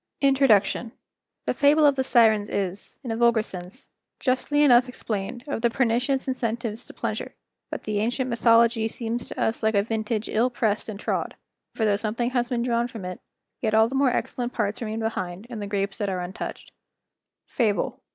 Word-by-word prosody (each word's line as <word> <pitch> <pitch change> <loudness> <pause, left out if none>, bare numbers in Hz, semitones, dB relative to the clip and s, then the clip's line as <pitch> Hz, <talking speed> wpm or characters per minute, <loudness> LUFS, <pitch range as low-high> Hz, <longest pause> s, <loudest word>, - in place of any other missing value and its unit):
INTRODUCTION.—The 245 -5 +1
fable 295 +1 +4
of 285 -1 +5
the 265 - +1
Sirens 220 -5 +4
is, 195 0 -3
in 245 - -4
a - - -1
vulgar 235 -1 +3
sense, 185 +6 -9 0.3
justly 285 +3 +1
enough 250 -2 +6
explained 220 -1 -4
of 280 - -3
the 235 - +3
pernicious 250 +3 +1
incentives 235 -2 -3
to - - -11
pleasure; - - -4 0.3
but - - -5
the 210 -1 -1
ancient 245 +4 0
mythology 230 -1 +4
seems 230 +1 -4
to - - -8
us 220 - 0
like 220 -1 +1
a 200 - +4
vintage 220 0 -2
ill 235 +4 +2
pressed 220 -3 -1
and 205 -2 -6
trod; - - -2 0.4
for 220 - +1
though 205 -1 +3
something 230 +3 -2
has 245 -1 0
been 240 -2 0
drawn 235 -1 +1
from 225 -6 -8
it, 180 0 -6 0.4
yet 220 -2 +1
all 220 0 +6
the 250 - -7
more 270 0 +3
excellent 245 0 -2
parts 210 -1 -1
remain 220 -1 -3
behind 190 -3 -3
in 230 - -5
the 205 - -4
grapes 200 0 -2
that 205 -2 -1
are 185 -1 -2
untouched. 180 +1 -6 0.7
FABLE. 215 -5 -1
230 Hz, 185 wpm, -25 LUFS, 210-245 Hz, 0.7 s, enough